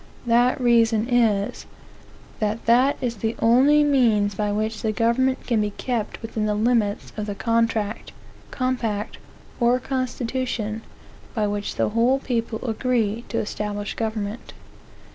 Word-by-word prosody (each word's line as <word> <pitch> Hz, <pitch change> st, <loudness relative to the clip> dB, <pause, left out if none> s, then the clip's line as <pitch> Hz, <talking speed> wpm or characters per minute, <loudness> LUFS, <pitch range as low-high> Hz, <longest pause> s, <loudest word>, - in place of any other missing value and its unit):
That 240 Hz, +2 st, +3 dB
reason 230 Hz, -2 st, +3 dB
is, 225 Hz, -5 st, +1 dB, 0.7 s
that 215 Hz, +1 st, -2 dB
that 250 Hz, +4 st, +4 dB
is 235 Hz, -2 st, -2 dB
the 220 Hz, +3 st, -2 dB
only 270 Hz, +6 st, +5 dB
means 230 Hz, -8 st, +3 dB
by 210 Hz, +1 st, -1 dB
which 215 Hz, +1 st, -2 dB
the 220 Hz, -, 0 dB
government 235 Hz, +4 st, +1 dB
can 230 Hz, -4 st, +1 dB
be 210 Hz, -, 0 dB
kept 230 Hz, +1 st, -4 dB
within 220 Hz, -1 st, -2 dB
the 210 Hz, -, 0 dB
limits 215 Hz, -2 st, 0 dB
of 210 Hz, 0 st, -3 dB
the 205 Hz, -, -3 dB
contract, 225 Hz, -2 st, 0 dB, 0.4 s
compact, 235 Hz, -5 st, -2 dB, 0.4 s
or 240 Hz, +1 st, +3 dB
constitution, 250 Hz, -4 st, -3 dB, 0.5 s
by 215 Hz, -2 st, +1 dB
which 205 Hz, 0 st, -3 dB
the -, -, +1 dB
whole 235 Hz, +5 st, +3 dB
people 235 Hz, -2 st, -3 dB
agree 230 Hz, -1 st, 0 dB
to 230 Hz, -, -2 dB
establish 205 Hz, -1 st, -3 dB
government. 220 Hz, -1 st, -4 dB
230 Hz, 135 wpm, -23 LUFS, 210-245 Hz, 0.7 s, only